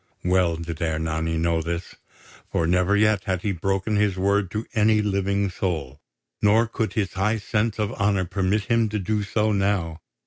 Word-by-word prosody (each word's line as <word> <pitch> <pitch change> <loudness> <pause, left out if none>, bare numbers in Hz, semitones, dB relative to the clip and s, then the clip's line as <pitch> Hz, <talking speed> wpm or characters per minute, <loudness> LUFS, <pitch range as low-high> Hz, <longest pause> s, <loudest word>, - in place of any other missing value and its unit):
Well 90 -2 +2
did 85 -1 -6
Ernani 80 0 -1
know 85 0 +1
this; 85 +2 -4 0.6
for 80 - +1
never 90 +4 +2
yet 105 -2 +2
had 95 -2 -2
he 105 - 0
broken 95 +4 -1
his 105 -3 +1
word 100 0 +1
to 110 +4 -4
any 110 0 +3
living 100 -1 0
soul, 80 -8 -3 0.4
nor 110 +3 +4
could 110 -1 -3
his 105 -5 -1
high 105 +4 +1
sense 110 0 -1
of 105 +1 -1
honour 100 -4 +1
permit 95 +3 0
him 115 0 +1
to 105 - -2
do 105 +2 -1
so 105 +1 0
now. 95 -5 0
100 Hz, 175 wpm, -24 LUFS, 85-105 Hz, 0.6 s, nor